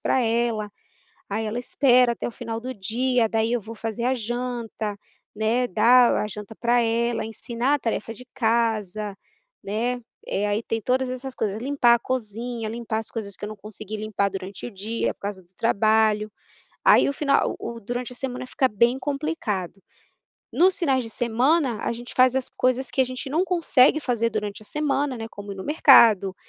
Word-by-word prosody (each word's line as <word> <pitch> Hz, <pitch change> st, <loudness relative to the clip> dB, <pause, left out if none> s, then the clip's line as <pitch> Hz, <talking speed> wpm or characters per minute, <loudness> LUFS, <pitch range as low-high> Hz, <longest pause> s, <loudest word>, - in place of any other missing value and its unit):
pra 260 Hz, -, +1 dB
ela, 230 Hz, -2 st, 0 dB, 0.6 s
aí 220 Hz, +2 st, -2 dB
ela 220 Hz, +3 st, -3 dB
espera 250 Hz, -1 st, +4 dB
até -, -, -4 dB
o -, -, -5 dB
final 230 Hz, -1 st, -5 dB
do 255 Hz, +2 st, -6 dB
dia, 230 Hz, +3 st, 0 dB
daí 225 Hz, 0 st, 0 dB
eu 240 Hz, -, 0 dB
vou 225 Hz, +3 st, -9 dB
fazer 225 Hz, +1 st, -4 dB
a 255 Hz, -, +2 dB
janta, 235 Hz, -3 st, -4 dB, 0.4 s
né, 230 Hz, +4 st, +1 dB
dar 245 Hz, +5 st, +5 dB
a -, -, 0 dB
janta 210 Hz, +1 st, -8 dB
pra 240 Hz, +1 st, +2 dB
ela, 230 Hz, 0 st, 0 dB
ensinar 235 Hz, +5 st, -1 dB
a 290 Hz, -, -4 dB
tarefa 225 Hz, -1 st, -3 dB
de 250 Hz, +3 st, -12 dB
casa, 220 Hz, -4 st, 0 dB, 0.5 s
né. 240 Hz, +5 st, -2 dB, 0.2 s
Eh, 205 Hz, +1 st, -1 dB
aí 205 Hz, +2 st, -1 dB
tem 225 Hz, 0 st, -2 dB
todas 255 Hz, +2 st, 0 dB
essas 255 Hz, +1 st, -6 dB
coisas, 210 Hz, -1 st, -2 dB
limpar 255 Hz, -3 st, +4 dB
a 235 Hz, -, -2 dB
cozinha, 235 Hz, -1 st, -4 dB
limpar 225 Hz, -1 st, -3 dB
as 225 Hz, -, -5 dB
coisas 200 Hz, -4 st, -3 dB
que -, -, -13 dB
eu 210 Hz, -, -3 dB
não 215 Hz, -, -8 dB
consegui 215 Hz, +1 st, -6 dB
limpar 210 Hz, -2 st, -1 dB
durante 195 Hz, 0 st, -7 dB
o 240 Hz, -, -6 dB
dia 215 Hz, +3 st, -2 dB
por -, -, -43 dB
causa 200 Hz, -2 st, -5 dB
do 175 Hz, -, -28 dB
trabalho, 215 Hz, -1 st, +2 dB, 0.5 s
aí -, -, +6 dB
o 280 Hz, -, 0 dB
final 280 Hz, -1 st, +1 dB
o 235 Hz, -, -6 dB
o 230 Hz, -, -9 dB
durante 245 Hz, +3 st, -4 dB
a -, -, -7 dB
semana 255 Hz, -1 st, -5 dB
fica 260 Hz, +1 st, +1 dB
bem 235 Hz, +5 st, +2 dB
complicado. 265 Hz, -, -3 dB, 0.7 s
Nos 370 Hz, +2 st, +4 dB
finais 270 Hz, -7 st, +2 dB
de -, -, -6 dB
semana, 245 Hz, +2 st, +1 dB
a -, -, -1 dB
gente 240 Hz, +1 st, -8 dB
faz 255 Hz, 0 st, +5 dB
as 265 Hz, -, +3 dB
coisas 255 Hz, +1 st, 0 dB
que -, -, 0 dB
a 260 Hz, -, +5 dB
gente 255 Hz, +1 st, -5 dB
não 330 Hz, +5 st, +2 dB
consegue 315 Hz, -6 st, +4 dB
fazer 235 Hz, -5 st, 0 dB
durante 210 Hz, -1 st, -4 dB
a -, -, -15 dB
semana, 285 Hz, 0 st, -1 dB
né, 225 Hz, -, -5 dB
como 205 Hz, 0 st, -8 dB
ir -, -, -7 dB
no 190 Hz, -, -7 dB
mercado, 225 Hz, -10 st, +6 dB
230 Hz, 195 wpm, -24 LUFS, 215-255 Hz, 0.7 s, aí